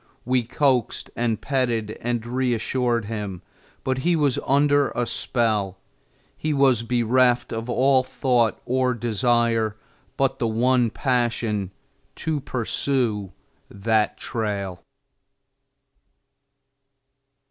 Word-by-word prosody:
We 125 0 +2
coaxed 125 0 0
and 115 -2 0
petted 120 -6 -1
and 120 -1 -2
reassured 120 -1 0
him, 105 -4 -5 0.4
but 130 0 -1
he 170 +5 +2
was 145 -5 +2
under 145 0 +3
a 120 - 0
spell; 110 -4 -1 0.6
he 155 -1 -2
was 135 -4 +4
bereft 120 +1 +2
of 115 +2 -4
all 130 +1 +4
thought 125 -3 +1
or 130 0 +1
desire 115 -1 +1 0.4
but 135 -1 +1
the 120 - +1
one 120 +2 +2
passion 120 -6 -1 0.5
to 160 -2 -2
pursue 120 -5 -1 0.4
that 110 +2 0
trail. 100 -6 -3
120 Hz, 100 wpm, -23 LUFS, 110-130 Hz, 0.6 s, was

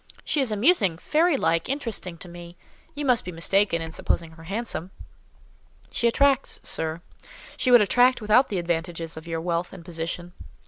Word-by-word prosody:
She 295 - 0
is 255 -5 0
amusing, 210 - +3
fairy 310 - +2
like, 165 -3 0
interesting 230 -10 -3
to 180 - -10
me;—you 175 - -10
must 250 -3 +3
be 180 - -6
mistaken 170 +1 +1
in 160 - -6
supposing 165 0 -2
her 165 0 -14
handsome?" 195 -2 -4 1.0
"She 235 - +1
attracts, 275 +2 +2
sir: 160 +1 -2 0.5
she 255 - -1
would 245 -2 +8
attract 245 +5 +4
without 220 +4 +4
the 200 - -2
advantages 170 -1 -3
of 160 +1 -10
your 165 -1 -3
wealth 170 0 -2
and 180 -3 -11
position." 175 +1 -5
180 Hz, 165 wpm, -25 LUFS, 165-245 Hz, 1.0 s, would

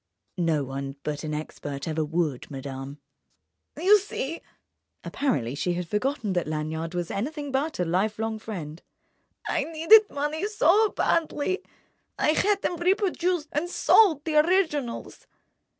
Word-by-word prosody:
"No 160 -4 +1
one 135 +1 -5
but 150 0 -3
an 155 -1 -3
expert 145 -2 -6
ever 160 0 0
would, 155 -4 -2
madame." 135 0 -7 0.8
"You 390 +6 +6
see"—apparently 275 - -5
she 175 +5 -1
had 175 -1 -3
forgotten 215 - -1
that 175 -3 -1
Lanyard 160 +2 -3
was 175 -1 -2
anything 290 +6 -3
but 280 +1 -1
a 180 - +1
lifelong 215 +5 -1
friend—"I 170 -8 -7
needed 330 +7 +6
money 295 +6 -2
so 420 +1 +4
badly, 335 +2 0 0.6
I - - +2
had 400 +6 +2
them 350 - -1
reproduced 360 -3 0
and 310 +4 -1
sold 345 -6 +4
the 310 -2 +1
originals." 305 -7 0
235 Hz, 125 wpm, -26 LUFS, -, 0.8 s, You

